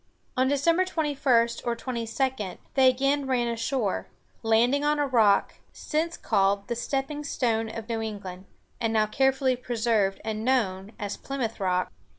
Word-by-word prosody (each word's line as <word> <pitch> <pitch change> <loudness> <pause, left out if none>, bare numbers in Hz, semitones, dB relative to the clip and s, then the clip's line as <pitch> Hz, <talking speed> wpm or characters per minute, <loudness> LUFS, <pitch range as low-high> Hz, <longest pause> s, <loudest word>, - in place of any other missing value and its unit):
On 255 +1 +2
December 330 +6 +3
21 285 -9 +2 0.2
or 235 -1 -1
22 235 -2 -2 0.2
they 265 -1 +6
again 275 +2 +1
ran 245 -2 +1
ashore, 230 -2 -1 0.3
landing 240 +5 +3
on 295 0 +2
a 290 - +2
rock, 225 -7 +3 0.2
since 330 +2 -2
called 200 +1 +1
"the 235 - -2
stepping 270 +4 -2
stone 225 -5 0
of 225 0 -7
New 230 -2 -2
England," 195 -4 -6 0.3
and 225 -1 0
now 215 -1 +3
carefully 265 +3 +2
preserved 225 -5 0
and 220 0 -3
known 210 -5 0
as 205 -1 -4
"Plymouth 255 -6 -4
Rock." 185 -2 0
235 Hz, 150 wpm, -27 LUFS, 220-270 Hz, 0.3 s, they